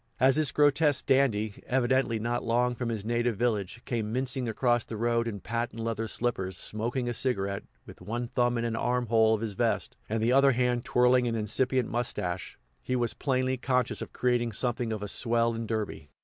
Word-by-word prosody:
As 130 +1 +5
this 155 -2 +3
grotesque 145 -1 +3
dandy, 110 -6 +1
evidently 130 -2 +1
not 120 +2 -2
long 120 +1 +1
from 120 -1 -3
his 110 -3 -4
native 120 -1 0
village, 115 -1 -1
came 110 -3 -2
mincing 125 0 -1
across 120 +1 +1
the 110 - -7
road 115 +1 +1
in 105 -3 -4
patent 115 0 -3
leather 115 0 -2
slippers, 95 -6 -2
smoking 120 +6 -2
a 120 - -1
cigarette, 100 -6 -1 0.2
with - - -13
one 120 +6 -3
thumb 120 -1 +1
in 115 - -1
an 115 -1 -1
arm 125 +2 0
hole 110 -1 +4
of 110 - -5
his 110 -3 -3
vest, - - -1
and 110 +1 -1
the 120 +2 +3
other 135 0 +5
hand 125 0 0
twirling 125 0 +3
an 115 - -1
incipient 125 +3 +1
mustache, 95 -6 -3 0.2
he 130 - -2
was 120 -2 0
plainly 130 -2 0
conscious 125 -1 0
of - - -6
creating 120 -2 0
something 120 +1 -1
of 105 -2 -3
a - - -3
swell 115 +2 +1
in 115 0 -4
Derby. 105 -9 -4
120 Hz, 195 wpm, -28 LUFS, 110-125 Hz, 0.2 s, As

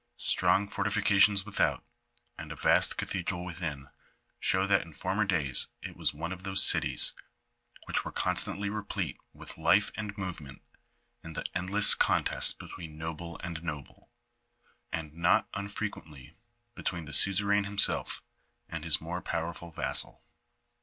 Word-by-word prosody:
Strong 100 +1 +3
fortifications 100 -1 +4
without, 80 - 0 0.5
and - - -8
a - - -6
vast - - +3
cathedral 90 -1 -3
within, 80 -6 -5 0.5
show 95 +1 +2
that 100 0 +3
in 80 - -11
former 95 +7 -1
days 75 -9 +3 0.2
it - - -7
was - - +1
one 80 +4 -5
of 95 -1 -6
those 95 0 +1
cities - - +3 0.7
which - - 0
were - - -6
constantly 100 +1 0
replete 105 0 -4
with - - -11
life 85 +6 +3
and 105 -1 -5
movement 90 -8 -7 0.6
in 80 - -9
the - - -5
endless 95 +4 +4
contests - - +3
between 80 -3 -9
noble 80 +1 -6
and 85 -2 -5
noble, 75 -4 -7 0.8
and 80 -2 -5
not 85 +1 +2
unfrequently 100 -8 -6 0.4
between 85 -2 -4
the 75 - -9
suzerain 100 +4 +4
himself 100 0 +1 0.4
and 80 -1 -6
his 80 -2 +4
more 90 +3 -5
powerful 85 +1 -4
vassal. 80 - -2
90 Hz, 135 wpm, -30 LUFS, 80-100 Hz, 0.8 s, fortifications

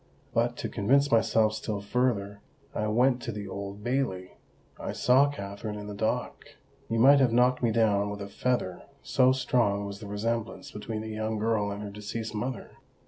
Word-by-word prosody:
But, 120 +1 +1
to - - -3
convince 140 +7 +2
myself 110 -1 +3
still 110 -1 -3
further, 100 -2 -1 0.3
I 105 - -1
went 125 +3 +3
to 120 - -4
the 105 -2 -6
Old 100 +1 -6
Bailey—I 120 -8 -4
saw 135 +3 +4
Katherine 105 -3 -6
in 105 - -7
the 105 - -6
dock: 110 +2 -2 0.5
you 115 - 0
might 140 +5 +7
have 130 -3 +4
knocked 125 +2 +3
me 120 - +2
down 105 -3 +2
with 100 0 -5
a - - -6
feather, 100 -4 -1 0.2
so 130 0 +4
strong 115 -6 +1
was 100 0 -6
the 105 - -8
resemblance 115 +2 -3
between 110 +1 -5
the 110 - -6
young 110 0 -2
girl 110 -1 +1
and 100 +1 -5
her 100 - -6
deceased 105 +2 -5
mother! 120 +4 -5
110 Hz, 180 wpm, -28 LUFS, 100-120 Hz, 0.5 s, might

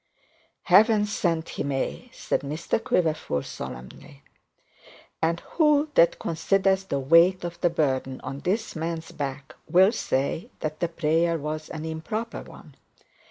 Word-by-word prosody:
'Heaven 210 +3 +5
send 170 -6 -1
he - - -5
may,' 140 - -3
said - - -2
Mr 155 +9 -2
Quiverful, 155 - 0
solemnly. 65 +3 -9 1.0
And 165 +1 +1
who 300 -2 +2
that 170 -8 +5
considers 190 +3 +1
the 140 - -2
weight 165 +7 +4
of 175 0 -6
the 175 - +4
burden 135 -5 -1
on 135 - -6
this 200 +8 -2
man's 165 0 -4
back, 140 -1 -5 0.2
will 185 +5 +6
say 140 - -2
that 155 0 -3
the 170 - +1
prayer 165 0 +1
was 155 +1 -5
an 155 0 -6
improper 160 +9 -4
one? - - -14
165 Hz, 135 wpm, -25 LUFS, 150-190 Hz, 1.0 s, will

